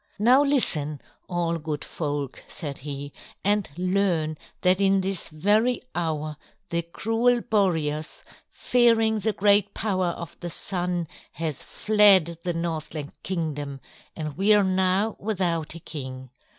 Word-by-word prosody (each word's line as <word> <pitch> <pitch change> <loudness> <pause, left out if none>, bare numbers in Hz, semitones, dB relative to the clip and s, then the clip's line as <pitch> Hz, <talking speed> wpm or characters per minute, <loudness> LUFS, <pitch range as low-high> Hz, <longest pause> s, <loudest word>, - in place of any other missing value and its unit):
"Now 245 +6 +5
listen, 155 - +2 0.3
all 170 -2 -1
good 150 -2 -4
folk," 145 -4 -4
said 145 -6 -6
he, 140 0 -6 0.3
"and 205 0 +1
learn 180 -4 +1 0.3
that 185 +1 +3
in 195 0 +4
this 190 -1 -3
very 210 +11 +2
hour 155 -3 -2 0.3
the 170 0 0
cruel 225 +8 +1
Boreas, 165 -9 0 0.3
fearing 230 -3 +3
the 220 +2 0
great 205 0 +3
power 185 -4 0
of 170 -2 -6
the 175 - -5
Sun, 175 -1 -1 0.3
has 160 -4 -3
fled 195 -6 +4
the 175 -1 -1
Northland 155 -3 -4
Kingdom, 145 -6 -3 0.4
and 155 -3 -5
we 205 +3 +5
are 205 - +4
now 190 +3 +1
without 175 -7 -1
a - - -7
king. 130 -5 -8
175 Hz, 130 wpm, -25 LUFS, 155-205 Hz, 0.4 s, Now